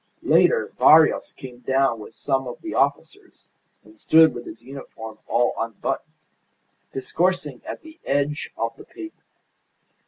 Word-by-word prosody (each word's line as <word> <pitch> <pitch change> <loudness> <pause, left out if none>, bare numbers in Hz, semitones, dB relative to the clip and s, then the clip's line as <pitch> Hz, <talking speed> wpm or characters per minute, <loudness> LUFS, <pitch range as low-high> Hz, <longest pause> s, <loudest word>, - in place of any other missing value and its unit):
Later 475 -1 +3
Barrios 155 0 +6
came 125 -2 -11
down 130 -2 +1
with 110 +1 -11
some 135 -2 -1
of 120 - -7
the 335 - -5
officers, 395 -2 -2 0.3
and 325 - -19
stood 160 - +6
with 120 0 -8
his 115 - -10
uniform 115 -4 -10
all 120 +1 +2
unbuttoned, 115 -2 -3 0.8
discoursing 150 0 -1
at - - -7
the 320 +1 -14
edge 145 +2 -1
of 115 0 -2
the - - -12
pavement. 325 -1 -11
135 Hz, 135 wpm, -23 LUFS, 120-160 Hz, 0.8 s, Barrios